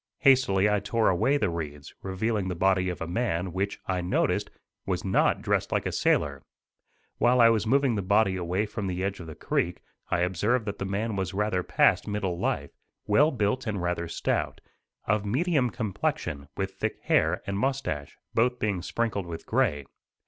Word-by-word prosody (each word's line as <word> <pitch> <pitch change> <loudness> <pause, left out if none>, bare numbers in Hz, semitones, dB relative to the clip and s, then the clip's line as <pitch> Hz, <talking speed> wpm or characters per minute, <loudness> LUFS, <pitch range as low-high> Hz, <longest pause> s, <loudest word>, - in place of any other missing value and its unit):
Hastily 125 -8 +4
I 105 -1 +2
tore 110 +2 +1
away 130 +10 +2
the 105 -10 0
reeds, 75 -3 -6
revealing 95 +1 -1
the 90 - -2
body 95 +1 +2
of 90 - -5
a 80 - -3
man, 90 -3 -1
which, 100 +2 -2
I 95 -2 -1
noticed, 90 - 0 0.3
was - - -2
not - - +2
dressed - - 0
like - - 0
a - - -1
sailor. 70 -2 +1 0.8
While 125 +1 +4
I 115 -1 +8
was 110 -1 +1
moving 135 +1 +3
the 105 - -1
body 95 +1 +3
away 90 +3 -1
from 105 -1 -4
the 90 0 -2
edge 100 0 -2
of 85 - -8
the 80 - -8
creek 90 +1 -1 0.3
I 85 - +1
observed 105 +7 +1
that 100 - -5
the 95 - -2
man 105 +3 -2
was 95 -1 -3
rather 105 -2 +1
past - - +3
middle 95 -4 -2
life, 70 0 -1 0.3
well 140 +9 +4
built 120 -1 -1
and 105 -3 -1
rather 90 -1 -2
stout, - - -2 0.5
of 105 0 +1
medium 135 - +1
complexion, 95 - -3
with - - -2
thick - - -3
hair - - +2
and 100 0 -2
moustache, 105 - -2 0.2
both 125 +2 +2
being 100 -6 -1
sprinkled 100 -1 -2
with 85 -1 -7
gray. 75 -1 +1
100 Hz, 185 wpm, -27 LUFS, 90-115 Hz, 0.8 s, I